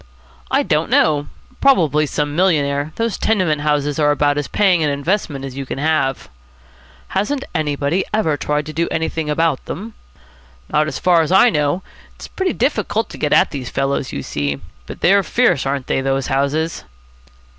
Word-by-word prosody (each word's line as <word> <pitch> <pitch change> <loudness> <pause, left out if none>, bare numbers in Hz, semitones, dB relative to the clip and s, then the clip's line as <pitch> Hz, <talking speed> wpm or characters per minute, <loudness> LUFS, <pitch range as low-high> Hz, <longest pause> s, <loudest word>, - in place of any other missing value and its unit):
"I - - +2
don't - - 0
know. 145 -2 +3 0.3
Probably 155 - +3
some 145 +1 -2
millionaire. 150 -5 +1
Those 230 -2 -2
tenement 180 -9 +1
houses 150 0 0
are 150 -1 +3
about 145 0 +2
as 145 - -3
paying 190 -5 +2
an 150 - +2
investment 140 -1 -2
as 130 -2 -8
you 140 - -4
can 130 - -6
have." 145 -2 0 0.8
"Hasn't 265 +9 -1
anybody 150 +2 0
ever 190 -9 +1
tried 150 0 -2
to 155 - -7
do 170 +2 0
anything 160 -1 -2
about 155 -2 +1
them?" 215 +8 -6 0.8
"Not 155 0 +2
so - - -5
far 175 -2 +4
as 160 - -2
I 195 +6 +6
know. 150 +4 0 0.3
It's - - -10
pretty 380 -1 -2
difficult - - 0
to - - -10
get - - -1
at - - +4
these 130 -4 -5
fellows, 135 0 -1
you 70 - -5
see. 70 -1 -2 0.3
But - - -9
they're 200 +2 +5
fierce, 185 - +1
aren't 135 -1 -2
they, - - 0
those 135 0 0
houses!" 145 +4 -1
150 Hz, 175 wpm, -19 LUFS, 140-175 Hz, 0.8 s, I